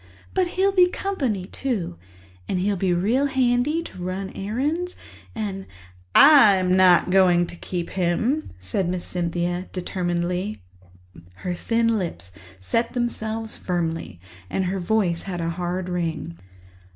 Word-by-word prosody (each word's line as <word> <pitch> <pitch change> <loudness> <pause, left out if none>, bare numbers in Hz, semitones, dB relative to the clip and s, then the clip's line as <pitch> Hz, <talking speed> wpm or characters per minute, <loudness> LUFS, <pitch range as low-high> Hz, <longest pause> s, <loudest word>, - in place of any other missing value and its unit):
But 370 -1 +2
he'll 390 +1 +4
be 365 -2 +5
company, 270 - -2
too, 205 - -3 0.5
and 185 - -1
he'll 200 +2 +1
be 185 0 0
real 220 +11 +2
handy 265 +4 +1
to 185 - -10
run 190 +2 -4
errands 290 - -2 0.4
and—" 200 -3 -4 0.5
"I'm 200 -11 +7
not 185 -1 +5
going 180 -2 +5
to 175 - -10
keep 175 0 -5
him," 190 - 0
said 95 - -2
Miss 180 -1 -3
Cynthia 175 +1 -2
determinedly. 180 +1 -2 0.9
Her 180 - 0
thin 230 +4 +1
lips 95 - -5 0.3
set 230 - -1
themselves 225 -2 -3
firmly 165 - -3 0.3
and 190 - -1
her 190 +2 -1
voice 180 -2 +1
had 175 -2 -3
a 165 0 -1
hard 180 +1 -3
ring. 165 - -3
185 Hz, 130 wpm, -23 LUFS, 175-230 Hz, 0.9 s, I'm